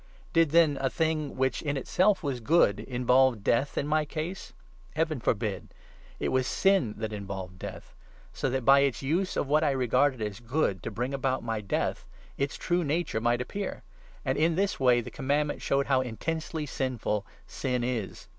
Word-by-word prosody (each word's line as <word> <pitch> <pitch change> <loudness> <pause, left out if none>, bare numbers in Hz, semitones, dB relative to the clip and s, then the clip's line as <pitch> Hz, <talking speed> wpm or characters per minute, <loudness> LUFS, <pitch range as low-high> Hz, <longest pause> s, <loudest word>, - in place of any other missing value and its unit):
Did, 165 -3 +4
then, 160 -2 +4
a 135 - +1
thing, 155 0 -1
which 130 0 0
in 145 -2 -2
itself 185 +9 +2
was 135 -4 -2
good, 120 - +3
involve 125 -2 +2
Death 130 +7 +1
in - - +1
13 - - -5
my 155 +1 +2
case? 160 +5 -5 0.4
Heaven 155 -2 0
forbid! 110 -3 -2 0.4
It - - -1
was 130 0 +1
sin 190 - +2
that 110 0 -4
involved 95 -2 -6
Death; - - -8 0.4
so - - -1
that, 130 -1 -2
by 140 0 +7
its 140 -1 +1
use 175 +7 0
of - - 0
what 150 +3 +3
I 150 - +3
regarded 130 0 +2
as 105 -2 -4
good 120 - -1
to - - -4
bring 125 +5 -3
about 130 -2 -1
my 115 -2 -2
Death, 100 - -2 0.3
its 140 0 -2
true 175 0 0
nature 150 -6 -1
might 120 +1 +2
appear; 195 +10 -5 0.4
and 135 +1 0
in 165 +1 +3
this 195 +2 0
way 125 -2 +4
the - - -9
Com 135 -3 -7
mandment 145 +1 +1
showed 140 0 +1
how 130 -2 +3
intensely 155 +6 -3
sinful 125 -7 -2 0.2
sin 125 -2 -2
is. 120 -5 -3
135 Hz, 185 wpm, -28 LUFS, 120-155 Hz, 0.4 s, by